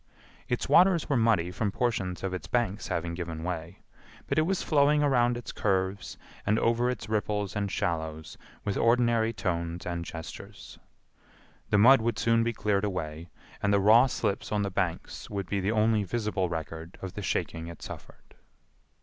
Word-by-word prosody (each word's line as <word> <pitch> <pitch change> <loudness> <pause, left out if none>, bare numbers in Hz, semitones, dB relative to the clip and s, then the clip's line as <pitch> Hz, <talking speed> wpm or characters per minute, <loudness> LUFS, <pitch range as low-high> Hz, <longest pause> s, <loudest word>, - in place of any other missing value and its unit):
Its - - -1
waters 180 -2 +5
were 140 - +2
muddy 110 -7 +2
from 105 +1 -1
portions 100 -6 -1
of 95 -1 -2
its 90 - -5
banks 115 -5 -1
having 85 0 -2
given 85 -2 -5
way, 85 0 -5 0.4
but - - +1
it 155 - +2
was 190 -1 0
flowing 150 0 +3
around 120 -4 +3
its 120 - -7
curves 95 -1 -1 0.3
and 105 +2 +2
over 120 +2 +2
its 125 -5 -4
ripples 105 -2 -1
and 100 -1 -1
shallows 80 -2 -3 0.3
with 100 - -1
ordinary 115 -1 +3
tones 85 -5 -3
and 85 -1 -3
gestures. 80 -1 -9 0.9
The - - +3
mud 125 +4 +7
would 115 -1 -1
soon 115 0 +3
be 120 - 0
cleared 105 -3 0
away 85 -5 -3 0.3
and 100 - +2
the 100 - +4
raw 110 +6 +6
slips 100 -5 -2
on 105 -1 +1
the 100 - -2
banks 90 -3 -3
would 100 -2 -3
be 100 - -1
the 95 +3 0
only 110 -1 +2
visible 100 -2 -1
record 80 +1 -6
of 95 -1 -5
the 105 - -5
shaking 85 -3 -2
it 85 -1 -10
suffered. - - -11
100 Hz, 175 wpm, -28 LUFS, 90-115 Hz, 0.9 s, mud